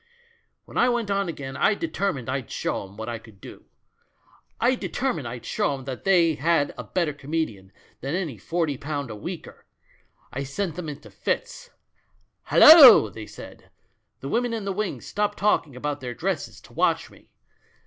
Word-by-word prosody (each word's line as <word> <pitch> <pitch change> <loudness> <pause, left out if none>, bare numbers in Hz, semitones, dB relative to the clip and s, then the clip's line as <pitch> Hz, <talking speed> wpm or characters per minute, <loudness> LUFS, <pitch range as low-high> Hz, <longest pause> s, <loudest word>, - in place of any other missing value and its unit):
"When - - -4
I 245 - +4
went 235 -4 -1
on 200 -2 0
again 135 -4 -6
I 215 - +2
determined 195 - -2
I'd 130 -3 -3
show 100 - -3
'em 100 +2 -17
what 110 0 -6
I 120 -1 -4
could 110 -3 -17
do; - - -12 0.9
I 245 +2 +3
determined 245 - -2
I'd 120 0 -7
show 140 - 0
'em 135 - -9
they 165 +5 +2
had 150 0 +1
a - - -7
better 170 -5 -1
comedian 140 -10 -4 0.3
than 140 +5 -3
any 160 - -3
forty 160 - -2
pound 145 -4 -4
a - - -6
weeker. 105 - -8 0.7
I 135 - -3
sent 160 +5 -3
them 170 -3 -5
into 145 -1 -10
fits. - - -3 0.8
'Hallo!' 270 - +9
they 110 -1 -9
said. - - -12 0.5
The 135 - -5
women 240 +4 0
in 220 -3 -4
the 195 - -2
wings 210 0 -3
stopped 210 0 -2
talking 165 -9 +1
about 145 +2 -4
their 125 -2 -5
dresses - - -3
to - - -18
watch - - +1
me. - - -20
155 Hz, 170 wpm, -25 LUFS, 130-200 Hz, 0.9 s, Hallo